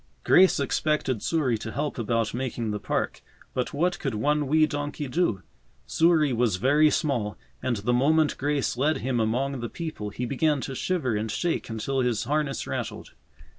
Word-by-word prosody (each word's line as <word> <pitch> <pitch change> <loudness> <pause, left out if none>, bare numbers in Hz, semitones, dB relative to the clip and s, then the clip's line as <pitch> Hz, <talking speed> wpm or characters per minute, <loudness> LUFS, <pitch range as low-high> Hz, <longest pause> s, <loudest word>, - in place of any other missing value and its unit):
Grace 185 -3 +5
expected 140 -4 0
Souris 135 -9 0
to 110 - -6
help 145 0 -3
about 115 -1 0
making 120 -3 -3
the 105 - -3
park, - - -2 0.3
but 125 - -2
what 175 +4 0
could 135 -6 -2
one 145 +6 +1
wee 155 +2 +4
donkey 145 -1 -4
do? 125 - 0 0.4
Souris 160 -4 +3
was 115 -4 +2
very 145 +10 +4
small, 120 - -1 0.2
and 125 - 0
the 110 +4 -1
moment 150 +5 +3
Grace 145 -2 0
led 145 +5 +1
him 130 -2 0
among 125 +5 0
the 120 -1 -4
people 155 -11 -5
he 125 +5 -4
began 145 +3 +1
to 135 - -5
shiver 130 -5 -1
and 110 +1 -2
shake 170 +8 -1
until 115 +5 -2
his 125 -4 +1
harness 145 +1 -1
rattled. - - -5
135 Hz, 170 wpm, -26 LUFS, 115-150 Hz, 0.4 s, Grace